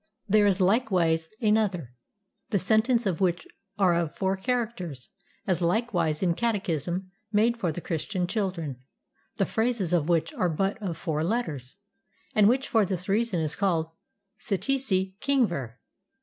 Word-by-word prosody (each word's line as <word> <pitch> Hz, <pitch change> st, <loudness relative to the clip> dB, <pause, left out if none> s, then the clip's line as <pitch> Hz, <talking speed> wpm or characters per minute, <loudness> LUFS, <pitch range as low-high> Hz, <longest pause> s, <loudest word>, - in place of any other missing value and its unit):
There 210 Hz, 0 st, +5 dB
is 195 Hz, -1 st, +2 dB
likewise 180 Hz, -6 st, +2 dB
another, 205 Hz, -, +1 dB, 0.6 s
the 205 Hz, -, +2 dB
sentences 220 Hz, +5 st, +2 dB
of 190 Hz, -1 st, -1 dB
which 175 Hz, -2 st, +1 dB, 0.3 s
are 190 Hz, -4 st, +4 dB
of 170 Hz, -2 st, -1 dB
four 190 Hz, 0 st, +1 dB
characters; 190 Hz, -, -3 dB, 0.4 s
as 185 Hz, -2 st, 0 dB
likewise 175 Hz, -4 st, +1 dB
a 175 Hz, -2 st, +3 dB
catechism 185 Hz, -, -1 dB, 0.2 s
made 230 Hz, +3 st, +2 dB
for 175 Hz, -7 st, 0 dB
the 175 Hz, -, -6 dB
Christian 180 Hz, +3 st, -2 dB
children, 180 Hz, -, -2 dB, 0.6 s
the -, -, +1 dB
phrases 220 Hz, -6 st, 0 dB
of 165 Hz, -2 st, +2 dB
which 165 Hz, -1 st, +1 dB
are 180 Hz, -, 0 dB
but 195 Hz, +6 st, -1 dB
of 175 Hz, -5 st, -3 dB
four 160 Hz, -3 st, -2 dB
letters, 160 Hz, -, -2 dB, 0.6 s
and 210 Hz, -1 st, +5 dB
which 265 Hz, +3 st, +1 dB
for 225 Hz, -4 st, +3 dB
this 185 Hz, -2 st, -3 dB
reason 205 Hz, -3 st, +1 dB
is 155 Hz, -1 st, -2 dB
called 165 Hz, -5 st, 0 dB, 0.5 s
"Ssee 200 Hz, -4 st, -1 dB, 0.2 s
tsee 190 Hz, -7 st, -1 dB
king 275 Hz, -3 st, +3 dB
ver." 130 Hz, -, -5 dB
185 Hz, 150 wpm, -27 LUFS, 165-215 Hz, 0.6 s, There